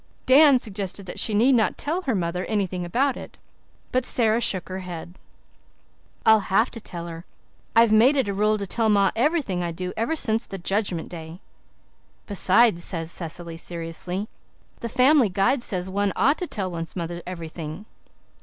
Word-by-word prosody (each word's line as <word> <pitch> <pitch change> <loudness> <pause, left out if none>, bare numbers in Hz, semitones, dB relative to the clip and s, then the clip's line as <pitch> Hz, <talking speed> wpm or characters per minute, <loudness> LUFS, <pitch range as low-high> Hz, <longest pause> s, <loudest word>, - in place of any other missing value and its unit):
Dan 280 +1 +7
suggested 200 -4 -5
that 180 - -5
she 215 - +4
need 245 +6 +4
not 225 -3 +2
tell 330 +5 -2
her 260 -10 -1
mother 180 0 -2
anything 190 -4 -2
about 255 +10 0
it; - - -10 0.5
but 255 0 +1
Sara 230 -2 +2
shook 190 -6 +2
her 185 0 -5
head. 175 -2 -8 1.1
"I'll 220 0 +7
have 220 +5 +3
to 230 - -8
tell 170 -3 -7
her. 165 0 -8 0.5
I've 230 -1 +5
made 240 +7 +5
it 265 - +1
a 200 - -1
rule 210 +2 +1
to 200 - -4
tell 225 +3 0
ma 200 -2 +3
everything 250 - 0
I 170 -1 -2
do 180 +2 -5
ever 230 +9 -1
since 225 -7 +1
the 195 - -6
Judgment 190 -2 -2
Day." 165 0 -9 0.9
"Besides," 200 -2 +3
added 165 -3 -4
Cecily 170 -1 -5
seriously, 175 +4 -5 0.5
"the 235 - -5
Family 255 0 +4
Guide 195 +8 +1
says 185 -5 -2
one 200 0 -1
ought 280 +5 +2
to 360 - -3
tell 190 - -3
one's 165 -1 -6
mother 170 -1 -4
everything." 165 +1 -7
200 Hz, 175 wpm, -24 LUFS, 175-235 Hz, 1.1 s, Dan